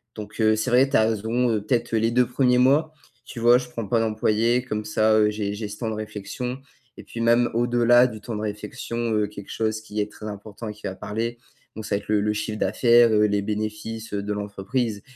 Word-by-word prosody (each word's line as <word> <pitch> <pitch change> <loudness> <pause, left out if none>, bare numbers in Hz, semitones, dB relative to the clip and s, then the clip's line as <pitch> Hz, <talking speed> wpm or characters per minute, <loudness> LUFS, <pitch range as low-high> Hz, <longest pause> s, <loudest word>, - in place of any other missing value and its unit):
donc 110 +1 -6
heu, 110 0 +4
c'est 110 +4 -1
vrai, 130 +3 +4
tu 140 - +3
as 110 - +4
raison, 115 +3 0
peut-être 120 0 -1
les 115 +1 +2
2 125 0 +3
1ers 125 0 +2
mois, 145 +5 +3 0.3
tu - - -9
vois, 120 +1 +6
je 125 0 -5
prends 115 -4 -5
pas 115 +2 +2
d'employé, 110 +2 +1
comme 105 -3 -3
ça, 110 +1 +2
heu, 105 -1 +4
j'ai 105 -1 -3
j'ai 105 0 -5
ce 105 - -8
temps 115 -1 -3
de 110 - -3
réflexion 110 +4 -5 0.4
et - - -10
puis 115 - -7
même, 120 +1 +3
au-delà 120 +1 +4
du 110 -4 -5
temps 115 +1 -5
de 105 - -4
réflexion, 110 +3 -5 0.2
heu, 105 -1 +2
quelque 100 -1 -11
chose 110 -1 -2
qui 105 -1 -6
est 105 0 -2
très 110 - -9
important 105 +2 -8
et 105 - -5
qui 105 - -20
va 95 - -3
parler, 115 +4 -4 0.4
donc, 110 - -7
ça - - 0
va 100 - 0
être - - -20
le 105 -1 +2
le 105 +1 0
chiffre 105 0 -4
d'affaires, 120 +3 +4
heu, 105 0 +4
les 100 -1 +1
bénéfices, 110 +2 -4
heu, 100 - -1
de 105 - -4
l'entreprise 105 +2 -3
110 Hz, 240 wpm, -24 LUFS, 105-120 Hz, 0.4 s, vois